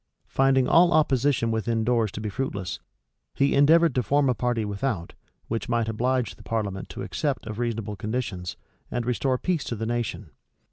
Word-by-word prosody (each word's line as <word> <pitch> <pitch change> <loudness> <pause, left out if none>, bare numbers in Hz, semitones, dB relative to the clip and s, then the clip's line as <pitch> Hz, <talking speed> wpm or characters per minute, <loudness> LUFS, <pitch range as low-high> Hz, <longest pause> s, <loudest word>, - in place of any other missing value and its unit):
Finding 135 -1 +3
all 175 +1 +5
opposition 140 -5 +2
within 110 0 0
doors 115 -3 +1
to - - -5
be 110 - -3
fruitless, 100 - -3 0.6
he 140 - +2
endeavored 160 +4 +5
to 125 - +2
form 140 +4 +2
a - - +4
party 120 -2 -1
without, 100 -3 -3 0.3
which 115 +2 -3
might 115 -2 +1
oblige 120 -2 0
the - - -14
parliament 100 -4 -3
to - - -6
accept 145 -3 -2
of 110 0 -6
reasonable 115 -3 -2
conditions, 105 -4 -4 0.3
and 120 -1 -2
restore 125 +1 +1
peace 175 +1 -1
to 115 - -3
the 110 +1 -3
nation. 120 -1 -3
120 Hz, 175 wpm, -26 LUFS, 110-135 Hz, 0.6 s, all